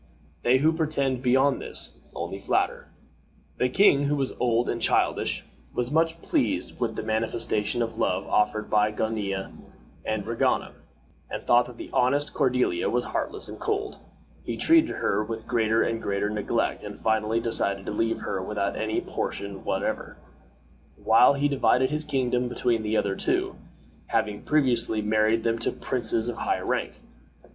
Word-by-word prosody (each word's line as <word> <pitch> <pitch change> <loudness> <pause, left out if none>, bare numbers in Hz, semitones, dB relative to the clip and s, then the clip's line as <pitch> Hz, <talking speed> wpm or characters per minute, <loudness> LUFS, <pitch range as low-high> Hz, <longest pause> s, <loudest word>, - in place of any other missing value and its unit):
They 125 +2 +4
who 155 +4 +3
pretend 140 -5 0
beyond 130 +2 +3
this - - -7 0.2
only - - -4
flatter." - - 0 0.7
The 125 - +2
king, 145 -2 +4
who 145 +1 +1
was 135 -2 -1
old 120 -1 +2
and 115 - -2
childish, - - +1 0.3
was 125 +1 -1
much 165 +1 +1
pleased 290 -2 -1
with 120 -2 -1
the - - -4
manifestation 110 +1 0
of 115 - -5
love - - 0
offered 105 0 +1
by 105 0 +3
Gonilla 105 -3 -2 0.5
and 110 -2 -2
Regana, 115 +1 0 0.6
and - - -5
thought 120 0 +4
that 125 -1 -11
the - - -9
honest 140 +4 +2
Cordiella 125 - +1
was 125 0 +1
heartless - - -4
and - - -9
cold. 420 -1 -2 0.4
He - - -4
treated 325 -1 +5
her 105 +2 0
with 110 +1 -6
greater 115 -1 +2
and 115 0 -2
greater 100 +1 -1
neglect 105 -1 -1
and - - -7
finally 110 0 +1
decided 100 -4 0
to - - -3
leave 115 +2 -1
her 95 - -3
without 100 +1 -2
any 110 0 -1
portion 100 -1 -5
whatever, - - -2 0.8
while 125 +5 +5
he 140 +1 +2
divided 130 -1 +2
his 150 0 -2
kingdom 125 -3 0
between 120 -2 0
the 110 0 0
other 100 -1 0
two, - - 0 0.5
having 105 -1 -1
previously 120 -7 +2
married 110 +1 +2
them 115 0 0
to - - 0
princes 115 -2 -1
of 120 - -3
high - - 0
rank. - - -2
115 Hz, 160 wpm, -26 LUFS, 110-130 Hz, 0.8 s, treated